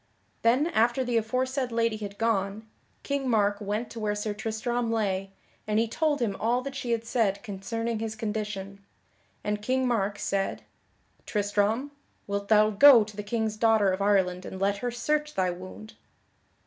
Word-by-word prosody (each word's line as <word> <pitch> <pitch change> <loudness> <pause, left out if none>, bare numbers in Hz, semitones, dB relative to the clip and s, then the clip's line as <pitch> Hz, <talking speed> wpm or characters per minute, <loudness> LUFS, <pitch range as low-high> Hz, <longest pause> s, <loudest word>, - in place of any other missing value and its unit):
Then 245 +6 +3
after 240 -4 +2
the 245 -2 0
aforesaid 255 +3 -1
lady 230 -1 +1
had 205 -1 -7
gone, 215 -1 -1 0.4
King 280 -2 -1
Mark 205 -2 +2
went 210 +3 -3
to 230 - -7
where 210 -1 -1
Sir 210 0 -2
Tristram 225 +2 -2
lay, 195 -3 -1 0.4
and 210 0 +1
he 225 +1 +2
told 295 +2 0
him 200 -4 -1
all 240 +3 +1
that 275 0 -5
she 255 -3 -4
had 230 -1 0
said 210 -4 0
concerning 225 +2 -3
his 220 -1 -4
condition; 210 -2 -4 0.6
and 210 0 -2
King 255 +4 +1
Mark 205 -4 0
said: 195 -1 -2 0.6
"Tristram, 210 +6 0 0.3
wilt 200 0 -3
thou 215 0 +5
go 240 +2 +8
to 210 0 -11
the 205 - -4
King's 220 0 -2
daughter 220 -3 +4
of 190 +1 -2
Ireland 190 -3 +2
and 190 - -7
let 200 +1 +1
her 245 +4 -2
search 300 +5 -1
thy 185 -1 +1
wound?" 185 +4 -10
220 Hz, 170 wpm, -27 LUFS, 200-235 Hz, 0.6 s, go